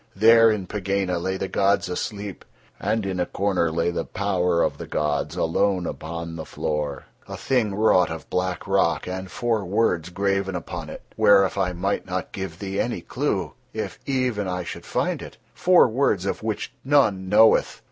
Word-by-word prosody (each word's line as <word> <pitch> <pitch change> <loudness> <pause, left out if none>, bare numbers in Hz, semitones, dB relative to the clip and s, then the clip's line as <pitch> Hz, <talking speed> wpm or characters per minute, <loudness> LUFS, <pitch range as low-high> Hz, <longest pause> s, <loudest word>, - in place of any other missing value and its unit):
There 115 +2 +7
in 105 -4 -1
Pegāna 95 -3 -1
lay 95 +2 -2
the 95 - -3
gods 100 0 +2
asleep, 100 +2 -5 0.4
and 110 -2 -1
in 95 -2 -2
a 90 - 0
corner 95 -4 0
lay 85 +2 0
the 85 - -2
Power 90 -4 0
of - - -1
the - - -6
gods 75 +1 -1
alone 90 +2 +1
upon 85 0 -5
the 80 - -5
floor, 75 -3 -3 0.2
a - - -6
thing 115 -7 0
wrought 105 -3 +4
of 80 - -7
black 90 +1 -2
rock 95 -4 +1
and 95 0 -5
four 115 +1 -1
words 90 -3 0
graven 100 0 -1
upon 85 - -6
it, - - -9
whereof 100 -2 +5
I 95 -2 0
might 95 +3 -2
not 90 0 -3
give 95 -1 -6
thee 100 -1 -4
any - - -1
clue, - - -2 0.2
if - - -5
even 125 -7 0
I 90 0 -2
should - - -8
find - - -1
it—four 180 -5 +2
words 110 -6 +1
of 100 - -2
which 110 +3 -3
none 110 -10 +2
knoweth. 110 +2 +4
95 Hz, 175 wpm, -24 LUFS, 90-105 Hz, 0.4 s, There